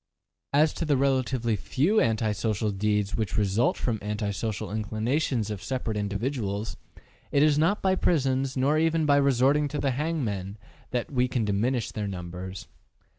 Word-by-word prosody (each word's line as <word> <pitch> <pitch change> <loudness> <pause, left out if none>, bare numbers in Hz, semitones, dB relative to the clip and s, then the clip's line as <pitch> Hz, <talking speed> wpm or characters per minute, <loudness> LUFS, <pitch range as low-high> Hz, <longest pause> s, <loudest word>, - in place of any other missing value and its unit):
As 150 +2 +4
to - - -3
the 145 -3 +2
relatively 130 -4 +1
few 160 - +1
anti 110 -2 +1
social 105 0 -1
deeds 105 0 0
which 110 -4 -2
result 105 +3 +2
from 115 -4 -1
anti 105 0 -2
social 100 0 -3
inclinations 110 +2 -1
of 100 -3 -5
separate 125 -2 -3
individuals, 105 0 -2 0.6
it 140 - +4
is 150 -1 +4
not 180 +7 +2
by 190 -1 +3
prisons, 135 -7 +1
nor 140 +4 +3
even 165 0 +2
by 145 -1 +4
resorting 140 +2 +3
to 150 +1 -4
the 135 -1 +1
hangmen, 120 - -2 0.3
that 125 +2 -2
we 125 -2 +2
can 120 -3 -1
diminish 115 +4 0
their 105 -1 -3
numbers. 90 0 -6
120 Hz, 160 wpm, -27 LUFS, 105-140 Hz, 0.6 s, As